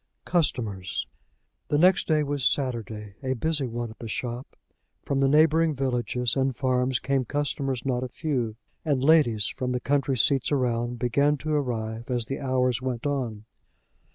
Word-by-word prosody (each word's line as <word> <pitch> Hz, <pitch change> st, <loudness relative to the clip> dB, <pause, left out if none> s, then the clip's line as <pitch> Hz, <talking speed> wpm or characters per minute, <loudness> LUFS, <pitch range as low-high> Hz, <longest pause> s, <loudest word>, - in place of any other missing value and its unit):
CUSTOMERS. 110 Hz, -, -1 dB, 0.6 s
The 145 Hz, -, +1 dB
next 180 Hz, +4 st, +4 dB
day 155 Hz, -2 st, +3 dB
was 145 Hz, -1 st, -2 dB
Saturday, 110 Hz, -7 st, -1 dB
a 130 Hz, -1 st, -1 dB
busy 145 Hz, +1 st, 0 dB
one 120 Hz, -1 st, -4 dB
at 110 Hz, -, -16 dB
the 115 Hz, -, -6 dB
shop. 120 Hz, +4 st, -5 dB, 0.5 s
From 140 Hz, -, 0 dB
the 135 Hz, -, +4 dB
neighboring 155 Hz, +2 st, +4 dB
villages 125 Hz, -2 st, -1 dB
and 135 Hz, -1 st, +1 dB
farms 130 Hz, 0 st, +1 dB
came 135 Hz, +1 st, 0 dB
customers 135 Hz, -2 st, -2 dB
not 125 Hz, -2 st, 0 dB
a -, -, -2 dB
few; 125 Hz, -6 st, -2 dB, 0.3 s
and 140 Hz, -5 st, 0 dB
ladies, 135 Hz, -9 st, +4 dB
from 125 Hz, -1 st, -3 dB
the 125 Hz, -, 0 dB
country 135 Hz, 0 st, 0 dB
seats 135 Hz, +4 st, +2 dB
around, 120 Hz, -3 st, 0 dB
began 140 Hz, +5 st, +2 dB
to 155 Hz, +2 st, -3 dB
arrive 115 Hz, -5 st, -2 dB
as 120 Hz, -2 st, -1 dB
the 135 Hz, +5 st, -4 dB
hours 130 Hz, -3 st, +1 dB
went 125 Hz, -1 st, -3 dB
on. 120 Hz, -7 st, -2 dB
130 Hz, 160 wpm, -26 LUFS, 120-145 Hz, 0.6 s, next